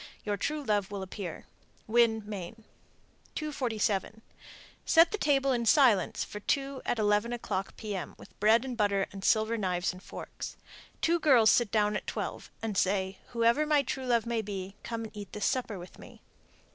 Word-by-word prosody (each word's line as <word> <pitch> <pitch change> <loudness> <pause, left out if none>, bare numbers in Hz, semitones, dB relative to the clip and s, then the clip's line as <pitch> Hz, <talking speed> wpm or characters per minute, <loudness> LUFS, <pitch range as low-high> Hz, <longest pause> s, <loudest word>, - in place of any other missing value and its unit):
Your 205 -1 0
true 300 +8 -2
love 205 -5 0
will 200 -1 -5
appear. 185 -3 -7 0.4
Winn, 225 -1 +3
Me. 200 -1 -6 0.8
247. 225 - -1 0.6
Set 330 0 +5
the 425 - -1
table 275 -3 +2
in 235 -2 0
silence 240 - +4
for 210 - -7
two 275 +4 -1
at - - +1
eleven 210 +2 +2
o'clock 200 -5 -3
P.M., 200 -6 -5
with - - -16
bread 220 +4 +4
and 255 -2 -4
butter 200 -3 +1
and 195 0 -9
silver 220 +1 +2
knives 180 -2 0
and 185 - -12
forks. - - -8 0.4
Two 340 +1 +2
girls 255 -9 +6
sit 240 -3 +3
down 210 -1 +2
at - - -4
twelve, - - -4
and 220 -3 -2
say, 190 0 0
"Whoever 235 +5 +2
my 295 -2 +4
true 260 0 -4
love 235 -2 +2
may 235 -1 0
be, 195 -2 -6
come 230 -1 -4
and 220 -1 -9
eat 205 -2 -8
this 210 - -2
supper 240 -5 -1
with 175 0 -11
me." - - -14
220 Hz, 175 wpm, -30 LUFS, 200-245 Hz, 0.8 s, girls